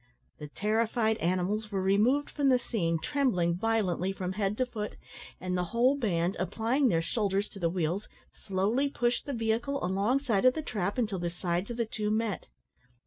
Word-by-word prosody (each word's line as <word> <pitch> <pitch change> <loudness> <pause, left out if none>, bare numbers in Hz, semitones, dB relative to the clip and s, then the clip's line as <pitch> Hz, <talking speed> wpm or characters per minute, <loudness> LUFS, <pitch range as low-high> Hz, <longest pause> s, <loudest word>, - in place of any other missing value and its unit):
The 150 - -6
terrified 220 +5 +1
animals 185 +5 0
were 195 - 0
removed 210 +10 +2
from 285 -2 +2
the 255 - +5
scene, 170 -9 -1
trembling 180 - +1
violently 195 -3 0
from 185 -1 -3
head 200 +1 -1
to 255 - +2
foot, 215 -4 -5 0.4
and 185 0 -2
the 180 0 0
whole 240 +9 +3
band, 185 -8 0
applying 230 - +1
their 165 -7 +2
shoulders 200 +1 0
to 200 - -11
the 170 -2 +1
wheels, 175 +3 -1 0.3
slowly 210 +9 0
pushed 240 -1 -1
the - - -2
vehicle 230 +2 -1
alongside 210 +4 +1
of 255 - +6
the 315 - -3
trap 205 -5 -2
until 210 -6 0
the 175 0 -1
sides 175 +2 -2
of 240 - -5
the 235 - +1
two 215 -1 -2
met. 215 -4 -1
210 Hz, 180 wpm, -30 LUFS, 185-235 Hz, 0.4 s, of